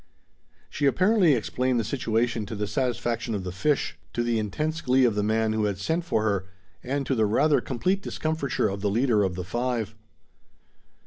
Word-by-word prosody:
She 140 +10 0
apparently 185 +2 +4
explained 125 +2 0
the - - 0
situation 115 -1 -1
to 110 - -5
the 105 0 -2
satisfaction 120 -2 -1
of 100 - -3
the 90 - -4
fish, 145 +10 0
to 120 - 0
the 120 -1 +1
intense 155 +10 -2
glee 130 -3 +3
of 120 - +3
the 105 - 0
man 110 +1 +1
who 110 -1 +1
had 100 -2 -1
sent 160 - -1
for 110 -10 0
her, 100 -3 0 0.4
and 140 +2 -2
to 135 - 0
the 110 -4 +2
rather 140 +5 +3
complete 180 +12 -1
discomfiture 155 -7 -1
of 100 0 -4
the 105 - +1
leader 115 0 +2
of 95 -3 0
the 90 - -4
five. 120 +3 -2
120 Hz, 190 wpm, -26 LUFS, 105-140 Hz, 0.4 s, apparently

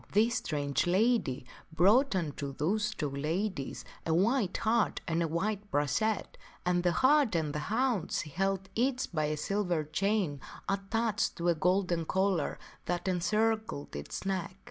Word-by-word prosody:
" - - -19
This 225 +4 +4
strange 145 -1 -1
lady 190 - +2 0.3
brought 205 - +4
unto 145 -5 -3
those 210 +9 0
two 155 -9 -3
ladies 155 +2 -2 0.2
a 160 - +1
white 205 +1 +2
hart 225 0 +1
and 165 -1 0
a 165 - +1
white 205 +5 -2
brachet, 145 +10 0 0.3
and 180 0 +2
the 175 0 +2
hart 265 - +4
and 155 -3 0
the 150 - -2
hound 225 -5 +1
she 150 - -2
held 195 +3 -1
each 250 +2 0
by 155 -2 +1
a 150 0 -1
silver 180 -1 0
chain 175 -2 0 0.3
attached 205 +2 0
to 170 +1 0
a - - +5
golden 180 0 +1
collar 190 -3 0 0.3
that 175 +1 -2
encircled 215 - 0
its 75 - -6
neck. 185 -2 -2
185 Hz, 155 wpm, -31 LUFS, 160-215 Hz, 0.3 s, a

